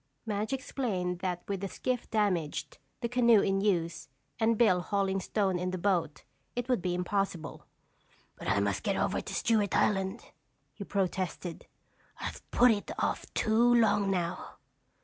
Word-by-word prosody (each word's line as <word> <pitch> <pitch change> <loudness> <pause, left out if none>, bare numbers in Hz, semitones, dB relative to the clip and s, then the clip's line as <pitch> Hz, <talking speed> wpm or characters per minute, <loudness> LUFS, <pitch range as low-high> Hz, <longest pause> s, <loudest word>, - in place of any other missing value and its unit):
Madge 210 0 -2
explained 210 -10 -2
that 180 -2 -3
with 200 -1 -2
the 195 - -3
skiff 250 +5 -3
damaged, 185 -8 -1 0.2
the 235 - 0
canoe 235 -2 +5
in 195 0 +1
use, 175 -8 0 0.3
and 225 0 +3
Bill 185 -6 +4
hauling 195 +1 0
stone 190 -1 0
in 180 +1 -1
the 185 - -3
boat, 175 -5 0 0.3
it 245 0 -2
would 250 -6 +1
be 180 -1 -1
impossible. 180 -3 -2 0.7
"But - - -8
I 100 - +2
must 100 -1 0
get - - 0
over - - 0
to - - -7
Stewart 215 -3 +2
Island," 195 +2 +1 0.5
he 200 - -7
protested. 185 -3 -3 0.5
"I've - - -5
put 245 0 +5
it 205 -2 -2
off - - -2
too 235 +2 +4
long 205 -3 +3
now." 180 -2 -2
195 Hz, 155 wpm, -30 LUFS, 180-220 Hz, 0.7 s, canoe